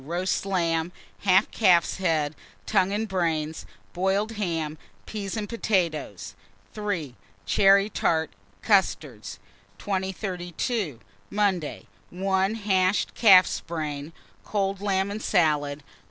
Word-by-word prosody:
Roast 175 +6 -2
lamb, 170 -3 0 0.3
half 195 +1 +3
calf's 180 -6 +3
head, 160 -5 0 0.3
tongue 195 -2 +2
and 215 +2 -1
brains, 160 -5 -2 0.3
boiled 195 +4 0
ham, 165 -8 -3 0.3
peas 205 -1 -5
and 210 -1 -3
potatoes. 170 - -1 0.4
3. 200 - -3 0.3
Cherry 195 0 +5
tart, 160 -6 0 0.3
custards. 145 - 0 0.4
2032. 190 - -3 0.3
Monday. 195 -7 -1 0.2
1. 190 +3 0
Hashed 195 -3 +1
calf's 190 -6 +6
head, 150 -2 -4 0.3
cold 195 -2 -1
lamb 195 -1 0
and 210 +1 -5
salad. 150 -7 +1
185 Hz, 100 wpm, -26 LUFS, 160-200 Hz, 0.4 s, calf's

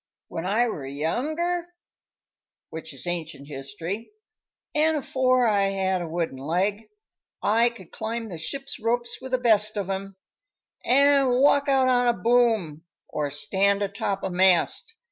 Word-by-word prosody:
"When 165 +2 -4
I 225 +5 +2
were 145 - -5
younger 310 - -2 1.0
which 160 0 -7
is 135 +2 -5
ancient 160 -5 -5
history 165 +9 -6 0.6
an' 310 +1 +2
afore 255 -3 +2
I 205 -3 +3
had 190 -1 0
a 170 - -4
wooden 165 -5 -3
leg, 195 +9 -1 0.5
I 230 +3 +4
could 195 -8 -14
climb 225 0 -4
a 170 - -6
ship's 275 - -5
ropes 240 +2 -1
with 260 0 -8
the 255 - +3
best 215 -3 +4
of 195 -1 -2
'em, 195 0 -5 0.7
an' 275 +1 +4
walk 280 +3 +3
out 265 -1 +3
on 245 -1 +3
a 240 - +4
boom, 220 -8 +1 0.3
or 150 -1 -2
stand 200 +7 +1
atop 200 0 -3
a 190 - -2
mast. 190 - +2
205 Hz, 145 wpm, -25 LUFS, 175-250 Hz, 1.0 s, I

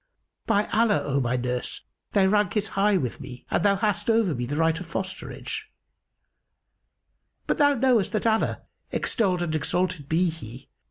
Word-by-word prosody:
By 205 +1 +3
Allah, 220 -1 +3
O 140 -1 0
my 125 0 0
nurse, 125 0 -2 0.3
thy 200 -2 +4
rank 205 0 +2
is 210 0 0
high 200 0 +2
with 130 -9 -3
me 125 - -10
and - - +2
thou 200 -1 +4
hast 210 +2 0
over 225 -6 +3
me 120 -2 -3
the 145 - -3
right 160 +1 +2
of 180 - -8
fosterage; 195 - -5 1.8
but - - -1
thou 285 -1 +5
knowest 245 -5 +2
that 215 - -1
Allah 220 -1 +1 0.3
(extolled 185 -6 0
and 165 -2 -2
exalted 165 -1 -1
be 170 +2 +2
He!) 125 -6 -11
185 Hz, 165 wpm, -25 LUFS, 155-215 Hz, 1.8 s, thou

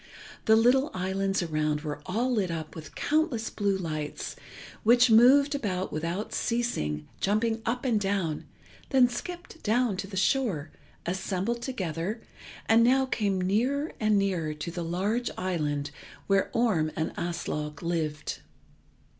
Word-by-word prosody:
The 220 - +6
little 250 +5 +4
islands 190 +1 0
around 155 -2 0
were 145 -2 -5
all 235 +7 0
lit 205 -7 +1
up 160 -2 -4
with 155 -3 -10
countless 290 -7 0
blue 200 -2 0
lights, 155 -4 -4 0.5
which 240 +2 +5
moved 270 +6 +7
about 190 -9 -2
without 170 +7 -3
ceasing, 75 - -1
jumped 220 +3 +1
up 245 +3 -1
and 230 -4 +2
down, 195 -6 -1 0.4
then 260 -2 +6
skipped 345 +7 -7
down 225 -2 +1
to 195 0 -4
the 190 -1 -6
shore, 190 - +1 0.3
assembled 190 +5 -2
together, 195 - -3 0.5
and 225 +1 +5
now 265 +3 +4
came 205 -7 0
nearer 250 - +1
and 215 -1 +3
nearer 180 -6 0
to 150 +3 -5
the 175 0 -4
large 200 +8 -1
island 150 -6 -1 0.3
where 195 -1 +2
Orm 210 -11 +2
and 160 - -2
Aslog 150 -3 -3
lived. 160 -3 -2
195 Hz, 140 wpm, -28 LUFS, 165-235 Hz, 0.5 s, moved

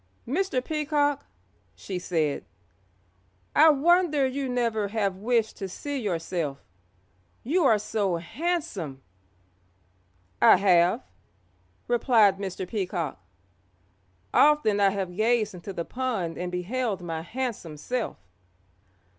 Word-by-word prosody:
"Mr. 275 -3 -1
Peacock," 295 -2 0 0.5
she 185 -2 -5
said, 160 -5 -1 1.1
"I 315 +1 +8
wonder 310 0 +3
you 265 0 -2
never 230 -4 0
have 200 -3 -1
wished 225 +1 0
to 195 -2 -5
see 285 +9 -4
yourself, 170 -7 -2 0.9
you 325 +6 +1
are 225 -5 +5
so 205 -3 -1
handsome." 185 - -3 1.4
"I - - +8
have," 180 -2 +3 0.8
replied 225 -5 +4
Mr. 190 -2 -4
Peacock; 175 - -3 1.1
"often 295 -9 +4
I 200 -1 +5
have 190 -2 -4
gazed 220 +1 +1
into 180 +2 -8
the 170 -3 -4
pond 230 -11 -2
and 180 0 -4
beheld 195 +2 -2
my 165 -2 -4
handsome 205 -6 -5
self." 245 +10 -3
210 Hz, 105 wpm, -26 LUFS, 180-260 Hz, 1.4 s, I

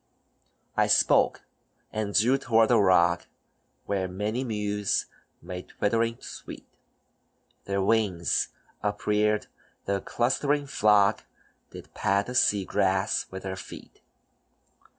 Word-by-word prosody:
I - - +3
spoke, - - +3 0.5
and 105 -2 -3
drew 125 +5 +4
toward 115 -3 +3
a 120 - +5
rock, 85 -3 +3 0.6
Where 95 -2 -1
many 105 +7 -3
mews 105 -4 -1 0.4
made 90 +1 -7
twittering 115 +2 0
sweet; - - -10 1.0
Their 100 0 -1
wings 100 -5 +1 0.3
upreared, 105 +1 0 0.4
the 100 0 -1
clustering 140 +6 0
flock 105 -7 +3 0.4
Did - - -12
pat 100 +1 +1
the 125 - -6
sea 105 -5 +3
grass 95 +3 0
with 95 0 -8
their 95 -1 -4
feet. - - -11
105 Hz, 110 wpm, -27 LUFS, 95-115 Hz, 1.0 s, a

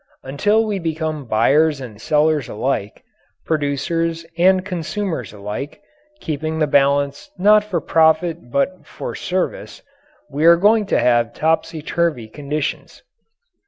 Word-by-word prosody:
Until 205 +12 +1
we 205 -3 -2
become 160 -3 -3
buyers 145 +7 +3
and 110 -5 -10
sellers 150 -3 +1
alike, 105 -2 -3 0.4
producers 165 +2 -1
and 185 +2 +3
consumers 180 - -4
alike, 105 +9 -6 0.4
keeping 155 +1 -3
the 155 - +2
balance 140 0 +1
not 210 +3 +5
for 200 -5 -2
profit 160 -2 +1
but 160 +9 -1
for - - -6
service, 185 - -4 0.4
we 150 +2 -2
are 170 0 +8
going 210 +3 +3
to - - +1
have 120 -1 +2
topsy 160 0 -1
turvy 160 -9 -1
conditions. 145 +5 -5
155 Hz, 125 wpm, -19 LUFS, 140-170 Hz, 0.4 s, are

